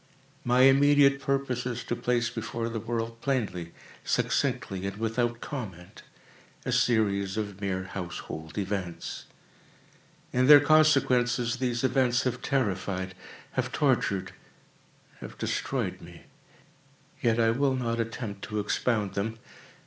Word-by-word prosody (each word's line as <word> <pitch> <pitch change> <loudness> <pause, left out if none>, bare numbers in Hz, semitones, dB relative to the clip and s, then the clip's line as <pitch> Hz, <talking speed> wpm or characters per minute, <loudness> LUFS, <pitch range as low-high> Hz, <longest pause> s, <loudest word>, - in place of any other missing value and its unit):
My 125 +1 +3
immediate 140 +1 +6
purpose 135 -3 -1
is 120 -1 -4
to 120 - -2
place 120 -1 0
before 115 +1 -4
the 115 -1 -3
world, 115 0 -4
plainly, 100 -11 -2 0.3
succinctly, 95 0 0
and 100 - -4
without 115 +1 -1
comment, 95 - -7 0.6
a - - -1
series 100 -4 +1
of 100 -2 -4
mere 95 -2 -1
household 85 -4 -7
events. 95 -4 -4 1.1
In 125 +1 +3
their 145 0 +11
consequences, 130 -6 +3
these 125 -1 -1
events 125 -1 +2
have 125 -1 -2
terrified—have 95 -7 -3
tortured—have 95 -1 -4
destroyed - - -2
me. - - -13 1.0
Yet 115 -1 +2
I 115 -1 +4
will 135 +2 +1
not 115 -2 -2
attempt 115 -3 -4
to 105 -1 -3
expound 105 0 0
them. 110 +3 -2
115 Hz, 115 wpm, -28 LUFS, 100-125 Hz, 1.1 s, their